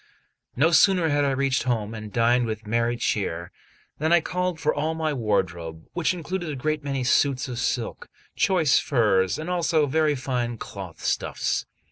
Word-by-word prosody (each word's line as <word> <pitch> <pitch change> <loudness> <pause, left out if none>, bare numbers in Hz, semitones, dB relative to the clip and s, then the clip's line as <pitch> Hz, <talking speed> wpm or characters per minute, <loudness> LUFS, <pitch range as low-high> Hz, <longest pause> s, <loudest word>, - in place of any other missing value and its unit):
No 160 +6 +3
sooner 180 -1 +5
had 145 0 +2
I - - +2
reached 135 -1 +1
home 115 -4 -1
and 110 -1 -7
dined 120 +2 +2
with 110 0 -5
merry 115 +2 0
cheer, 85 -7 -2 0.5
than 160 +2 0
I 175 - +7
called 180 0 -2
for 155 - +1
all 155 +2 -1
my 160 -1 -1
wardrobe, 90 - -2
which 175 -3 +1
included 175 0 -4
a 150 - -3
great 150 +3 -2
many 135 -2 -2
suits 130 +2 +2
of 125 -2 -5
silk, 120 -2 -2 0.3
choice 165 -7 +3
furs, 100 -8 +2
and 155 - -6
also 170 -3 +2
very 150 +1 +2
fine 125 -3 -2
cloth 95 -5 -9
stuffs. - - -1
135 Hz, 170 wpm, -25 LUFS, 115-155 Hz, 0.5 s, I